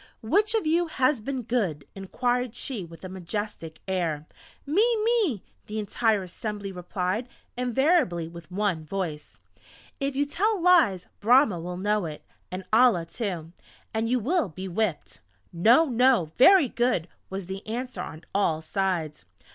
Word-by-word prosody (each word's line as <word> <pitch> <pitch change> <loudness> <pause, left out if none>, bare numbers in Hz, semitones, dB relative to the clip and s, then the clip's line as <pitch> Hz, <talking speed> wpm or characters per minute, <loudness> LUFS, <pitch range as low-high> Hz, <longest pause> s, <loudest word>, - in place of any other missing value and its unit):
"Which 415 - +2
of 440 - +1
you 335 +2 +2
has 260 -4 +1
been 260 +2 -3
good?" 195 - -1
inquired 245 +5 -1
she 240 -8 -3
with 165 +2 -11
a - - -4
majestic 185 -3 -5
air. 165 -5 -1 0.4
"Me... 320 +10 +3 0.2
Me 435 - +1
..." - - -41
the 215 - -5
entire 215 0 +1
assembly 200 +2 -5
replied 185 +5 -3 0.3
invariably 250 - +2
with 170 -1 -11
one 185 -4 -1
voice! 155 -3 -5 0.6
"If 275 -1 -1
you 285 +1 +2
tell 405 +8 0
lies 330 - +4
Brahma 230 - +4
will 180 +2 -5
know 205 -1 0
it, 150 -1 -9 0.3
and 185 +1 -5
Allah 220 -7 +5
too, 170 -4 -4 0.4
and 225 +1 0
you 250 +1 +2
will 270 - 0
be 185 +4 -7
whipped!" 185 -2 -2 0.3
"No! 230 - +5
No! 250 - +3
Very 360 +3 +7
good!" 240 -8 0 0.2
was 190 -1 -5
the 190 +2 -6
answer 250 +3 -4
on 155 +1 -8
all 165 -6 +1
sides. 170 -4 -2
210 Hz, 150 wpm, -26 LUFS, 180-255 Hz, 0.6 s, Very